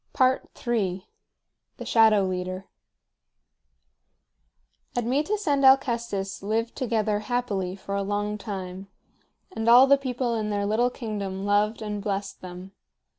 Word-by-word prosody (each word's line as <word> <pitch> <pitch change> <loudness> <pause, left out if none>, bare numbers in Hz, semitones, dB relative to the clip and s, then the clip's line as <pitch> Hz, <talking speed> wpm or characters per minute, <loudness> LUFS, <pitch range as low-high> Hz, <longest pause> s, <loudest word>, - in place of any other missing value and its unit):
III. 230 -6 0 0.7
THE - - -7
SHADOW 220 -3 +5
LEADER. 185 +1 -4 2.3
Admetus 295 - 0
and 280 -2 +2
Alcestis 235 -7 +2
lived 225 +3 -2
together 220 -5 0
happily 210 -5 -2
for 200 0 -7
a 200 - 0
long 205 +1 -2
time, 190 -2 -6 0.7
and 225 +1 0
all 245 +3 +9
the 280 +1 +5
people 250 -2 -2
in 215 -2 -2
their 205 -1 -1
little 225 +4 +2
kingdom 200 -5 -5
loved 210 +2 +1
and 210 -1 -4
blessed 200 -1 -4
them. 180 +1 -9
210 Hz, 120 wpm, -26 LUFS, 195-240 Hz, 2.3 s, all